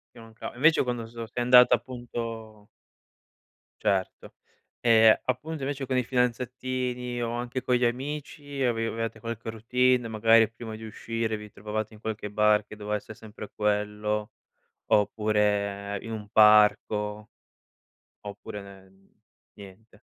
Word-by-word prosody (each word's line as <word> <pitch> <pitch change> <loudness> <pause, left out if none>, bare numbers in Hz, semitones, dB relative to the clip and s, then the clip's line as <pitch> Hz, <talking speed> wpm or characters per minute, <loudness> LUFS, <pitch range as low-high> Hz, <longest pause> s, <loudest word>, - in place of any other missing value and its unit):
Ti - - -13
mancav 115 0 -9
invece 155 +6 +4
quando 120 -2 -3
so 115 0 -8
sei 120 +2 -3
andata, 125 0 +7
appunto 115 -3 -7 1.1
Certo. 100 -3 -1 0.5
Ehm, 110 -2 +6
appunto 145 +5 -3
invece 140 0 -3
con 130 0 -2
i 125 - +2
fidanzatini 125 0 -2
o 115 0 -2
anche 120 +2 -3
con 125 - +2
gli 125 0 +2
amici 145 +2 -4
avevate 115 -2 -1
qualche 115 -1 -5
routine, 125 +2 +1
magari 115 0 +4
prima 115 -1 -8
di 110 - -10
uscire 110 0 -3
vi 105 0 -10
trovavate 110 +2 -5
in 105 - -15
qualche 110 -1 -4
bar 105 0 +3
che 105 - -11
doveva 105 0 -2
essere 110 - -10
sempre 105 -1 -10
quello, 105 +1 -1 0.5
oppure 105 -1 +1
in 115 - -7
un 105 -2 -7
parco? 105 0 +4 0.9
Oppure 105 0 -7
nen 95 -1 -16 0.4
niente. 100 +2 -15
110 Hz, 130 wpm, -27 LUFS, 105-120 Hz, 1.1 s, andata